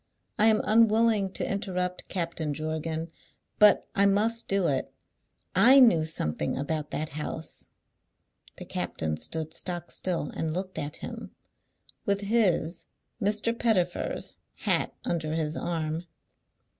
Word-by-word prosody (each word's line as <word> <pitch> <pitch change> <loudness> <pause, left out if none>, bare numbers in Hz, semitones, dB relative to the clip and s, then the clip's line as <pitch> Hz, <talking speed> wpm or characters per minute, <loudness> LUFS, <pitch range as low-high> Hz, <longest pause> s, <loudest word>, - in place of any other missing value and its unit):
I 215 - +6
am 215 -1 +4
unwilling 220 -2 +4
to - - -2
interrupt 180 -3 -2
Captain 165 -4 -2
Jorgan, 160 +1 -3 0.5
but 210 -1 +6
I 200 -2 +4
must 220 +4 +1
do 195 -3 +2
it. 135 -2 -1 0.6
I 260 +4 +7
knew 200 -12 +6
something 75 - -1
about 150 +2 -2
that 155 0 -3
house." 155 +2 -4 0.9
The - - -8
captain 80 -1 -3
stood 160 - -4
stock 175 -1 -3
still 175 -5 -2
and 160 -1 -2
looked 185 +1 -4
at 145 0 -4
him, - - -8 0.7
with 200 -2 0
his 195 -6 +1 0.3
(Mr. 210 +3 +1
Pettifer's) 190 -7 0 0.2
hat - - 0
under 155 -2 -1
his 155 -1 -1
arm. 165 0 -2
175 Hz, 125 wpm, -28 LUFS, 155-205 Hz, 0.9 s, I